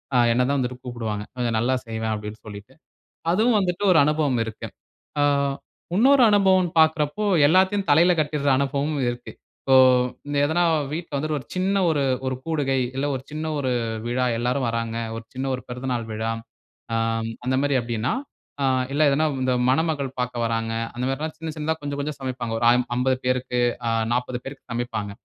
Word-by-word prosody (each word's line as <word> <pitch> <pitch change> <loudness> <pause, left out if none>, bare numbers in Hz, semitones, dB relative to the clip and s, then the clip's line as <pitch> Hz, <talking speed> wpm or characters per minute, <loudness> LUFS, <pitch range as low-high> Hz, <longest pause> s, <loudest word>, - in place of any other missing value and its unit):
அ - - +5 0.2
என்ன 125 - +2
தான் 140 - +1
வந்துட்டு 125 0 -2
கூப்பிடுவாங்க. 110 -4 -4
கொஞ்சம் 120 -2 0
நல்லா 130 +3 +1
செய்வான் 110 -1 -3
அப்பிடின்னு 105 +1 -6
சொல்லிட்டு. 100 0 -10 0.6
அதுவும் 220 +3 +3
வந்துட்டு 180 +1 -1
ஒரு 170 - +6
அனுபவம் 150 -5 +1
இருக்கு. 110 -1 -7 0.5
ஆ - - +4 0.7
இன்னொரு 260 +4 +5
அனுபவம்ன்னு 190 -4 +4
பாக்குறப்போ, 160 +5 +2 0.2
எல்லாத்தையும் 190 +3 +3
தலையில 170 +5 +6
கட்டிற 150 -2 0
அனுபவமும் 140 +1 -1
இருக்கு. 120 0 -6 0.3
இப்போ 135 - +3 0.7
எதனா 160 +4 +1 0.3
வீட்ல 165 -2 -5
வந்துட்டு 155 +1 -1
ஒரு 130 - -12
சின்ன 190 +2 +1
ஒரு 150 -3 +1 0.2
ஒரு 130 - -1
கூடுகை 145 -5 0 0.2
இல்ல 135 - -1
ஒரு 130 - -5
சின்ன 155 +1 -4
ஒரு 130 -2 -1 0.4
விழா 125 +1 0
எல்லாரும் 125 +2 0
வராங்க. 115 0 -2 0.2
ஒரு 115 - -7
சின்ன 130 +1 -3
ஒரு 125 - -9
பிறந்தநாள் 125 -2 -3
விழா. 110 +1 -2 0.6
ஆ - - +1 0.5
அந்த 130 - +1
மாதிரி 145 -1 +1
அப்பிடின்னா 115 0 -2 0.5
ஆ - - +3 0.3
இல்ல 150 +2 +3
எதனா 150 +3 +2 0.2
இந்த 130 0 +1 0.2
மணமகள் 145 -1 +1
பார்க்க 125 -1 -2
வராங்க 115 0 -1 0.2
அந்த 125 - -2
மாரில்லாம் 155 +4 -3
சின்ன 165 0 -5
சின்னதா 155 +1 -1
கொஞ்சம், 145 0 -4
கொஞ்சம் 145 0 -4
சமைப்பாங்க. 125 -3 -4
ஒரு - - 0
ஐம் 125 0 +2
50 130 +1 +2
பேருக்கு 125 -1 0 0.3
அ - - +2 0.2
40 125 0 -2
பேருக்கு 135 0 -9
சமைப்பாங்க. 110 -4 -3
135 Hz, 170 wpm, -23 LUFS, 120-155 Hz, 0.7 s, ஒரு